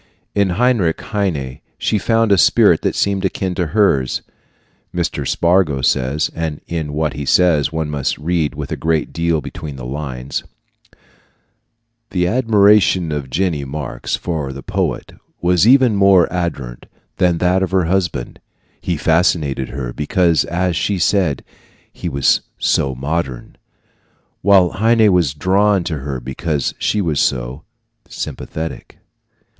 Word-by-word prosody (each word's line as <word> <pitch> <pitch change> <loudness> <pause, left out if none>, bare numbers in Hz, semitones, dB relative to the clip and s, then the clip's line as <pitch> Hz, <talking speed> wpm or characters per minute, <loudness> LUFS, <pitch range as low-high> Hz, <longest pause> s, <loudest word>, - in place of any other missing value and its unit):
In 100 -2 +2
Heinrich 115 -10 +2
Heine 80 -12 -3 0.2
she 105 - 0
found 115 0 +1
a 100 - +5
spirit - - +4
that - - -1
seemed 100 -1 0
akin 95 -2 -1
to 90 -2 -1
hers. 75 -8 +1 0.7
Mr. 85 -1 -2
Spargo 85 -6 +2
says 70 +6 +1
and 80 -2 -3
in 80 -3 -4
what 75 0 -1
he 75 - -5
says 75 -1 +3
one 80 -1 -2
must 70 -3 -2
read 80 -3 -1
a - - -4
great 80 -1 -1
deal 85 -1 0
between 75 +1 -7
the 65 -2 -8
lines: 65 -1 -5 1.7
The 90 -2 0
admiration 105 -5 +3
of 75 -3 -4
Jenny 80 0 -1
Marx 70 -2 -4
for 75 -6 -3
the 70 0 -9
poet - - -3 0.3
was 90 +3 +3
even 130 -3 +5
more 95 -3 +5
ardent 70 -9 -4 0.3
than 90 -2 +2
that 90 +2 +2
of 95 - 0
her 95 -2 +1
husband. 85 -8 -2 0.4
He 85 -3 -2
fascinated 75 -5 +1
her 65 -3 -5
because, 85 - +1
as 90 0 -1
she 100 +2 0
said, 90 -4 +1 0.5
he 85 - -5
was 70 -2 +2 0.2
"so 65 -1 0
modern," 70 -2 -4 0.9
while 95 -2 +5
Heine 110 0 +3
was 80 -6 +2
drawn 95 +4 +2
to 80 -3 -3
her 70 -1 -4
because 70 +4 -3
she 105 - 0
was 80 -5 0
"so 65 +4 -1 0.4
sympathetic." 80 +1 -6
85 Hz, 140 wpm, -18 LUFS, 70-95 Hz, 1.7 s, a